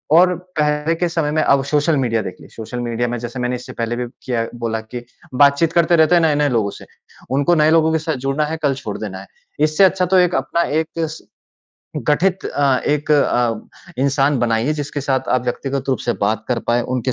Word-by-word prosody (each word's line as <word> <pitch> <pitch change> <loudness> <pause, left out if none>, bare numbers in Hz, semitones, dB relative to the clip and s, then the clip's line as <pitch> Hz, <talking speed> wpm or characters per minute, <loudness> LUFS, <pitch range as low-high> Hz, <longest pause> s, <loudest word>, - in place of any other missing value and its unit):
और 180 +1 +5 0.2
पहले 150 +2 +1
के 175 +1 -1
समय 160 -3 -1
में, 155 - +1
अब 140 -1 +3
सोशल 150 +2 +1
मीडिया 115 -4 0
देख 95 -3 -6
लें, - - -13
सोशल 115 +2 -6
मीडिया 120 0 -2
में 120 - -3
जैसे 120 +2 -6
मैंने 125 0 -1
इससे 125 - -9
पहले 115 0 -3
भी 125 0 -3 0.2
किया 115 -3 -1 0.2
बोला 110 -1 -2
कि 120 +2 -8 0.3
बातचीत 145 +4 +4
करते 170 0 +3
रहते 160 +1 +4
हैं 170 - +4
नए-नए 150 -2 +2
लोगों 110 -5 0
से। - - -12 0.5
उनको 140 +6 +2
नए 155 -1 +4
लोगों 160 0 +4
के 160 - +2
साथ 155 0 -2
जुड़ना 135 +3 0
है, 160 +2 -4
कल 140 -2 +2
छोड़ 110 -7 -6
देना 95 -3 -6
है। 100 - -12 0.3
इससे 155 +4 +3
अच्छा 185 -1 +3
तो 185 +2 +2
एक 180 -1 +3
अपना 135 +6 0 0.2
एक 160 - -6
स 160 -1 -3 0.9
गठित 180 +5 +1
अ, 140 -2 +1
एक 150 0 0
अ, 120 -6 -1
इंसान 140 0 +2
बनाइए 115 +4 +1
जिसके 145 -1 -4
साथ 135 -1 -1
आप 125 - +2
व्यक्तिगत 135 +2 -3
रूप 130 - +1
से 120 - -1
बात 105 +2 0
कर 125 - 0
पाएँ, 120 +1 +2
उनके 125 +1 -2
140 Hz, 215 wpm, -19 LUFS, 120-155 Hz, 0.9 s, और